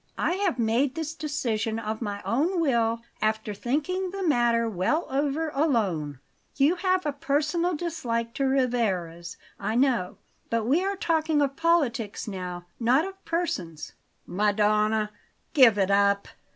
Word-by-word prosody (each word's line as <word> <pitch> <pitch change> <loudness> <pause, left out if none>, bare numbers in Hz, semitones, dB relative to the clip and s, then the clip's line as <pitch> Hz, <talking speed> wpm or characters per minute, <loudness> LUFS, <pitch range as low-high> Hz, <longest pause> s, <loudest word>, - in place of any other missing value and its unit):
I - - +1
have 385 -7 0
made 240 +4 +1
this 320 -1 -3
decision 240 -9 -2
of 220 0 -4
my 205 -2 -4
own 330 +10 +1
will, 235 -7 +1 0.2
after 215 0 0
thinking 305 - -1
the 385 -1 -3
matter 235 -4 +3
well 220 - 0
over 290 +3 0
alone. 200 - 0 0.4
You 295 +6 +3
have 370 -1 +1
a 295 - 0
personal 300 +5 0
dislike 235 -9 -3
to 275 - -1
Rivarez, 200 -10 -1 0.2
I 215 +2 -2
know; 245 -8 +1 0.3
but 230 -1 0
we 295 +10 +2
are 395 +1 -1
talking 320 -4 +1
of 275 -1 +1
politics 280 -13 0
now, 180 -3 -5
not 255 +6 +3
of 385 0 -9
persons." 185 - -3 0.3
"Madonna! 210 +2 +1 0.4
Give 255 -8 +6
it 195 -1 +2
up! 200 0 +3
245 Hz, 140 wpm, -26 LUFS, 210-315 Hz, 0.4 s, Give